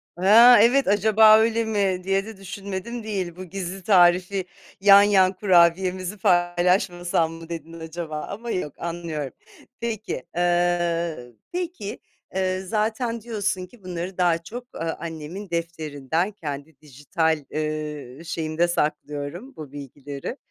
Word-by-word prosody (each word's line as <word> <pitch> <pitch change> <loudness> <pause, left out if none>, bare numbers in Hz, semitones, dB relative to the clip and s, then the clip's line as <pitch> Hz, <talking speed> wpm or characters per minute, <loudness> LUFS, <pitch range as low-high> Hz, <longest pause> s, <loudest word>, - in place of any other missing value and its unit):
Ha, 225 +7 +8
evet, 255 +2 +4
acaba 215 +2 +6
öyle 230 +1 +2
mi 195 -4 0
diye 195 +1 0
de 220 -3 -9
düşünmedim 200 +4 -6
değil. 190 -5 -3
Bu 185 0 -8
gizli 190 +1 -6
tarifi 185 0 +4 0.4
yan 200 0 +8
yan 195 -2 +4
kurabiyemizi 185 +1 +2
paylaşmasam 175 -2 +2
mı 165 0 -11
dedin 165 0 -7
acaba 160 -1 -5
ama 230 +4 -5
yok 150 -6 -3
anlıyorum. 165 -5 -4 0.5
Peki, 220 - -4
ııı, 170 -7 0 0.2
peki, 350 - -4 0.4
ııı, 185 0 -1
zaten 225 +2 -1
diyorsun 205 -5 -2
ki 210 +1 -20
bunları 180 +1 -5
daha 175 -2 +3
çok, 240 +9 -10
ııı, 165 0 -2
annemin 170 +4 -7
defterinden, 165 +1 -2
kendi 145 -5 -7
dijital, 150 +2 -1
ııı, 155 -1 -4
şeyimde 165 +1 -1
saklıyorum 150 - -3
bu 145 -3 -9
bilgileri, 145 - -7
180 Hz, 125 wpm, -24 LUFS, 160-205 Hz, 0.5 s, Ha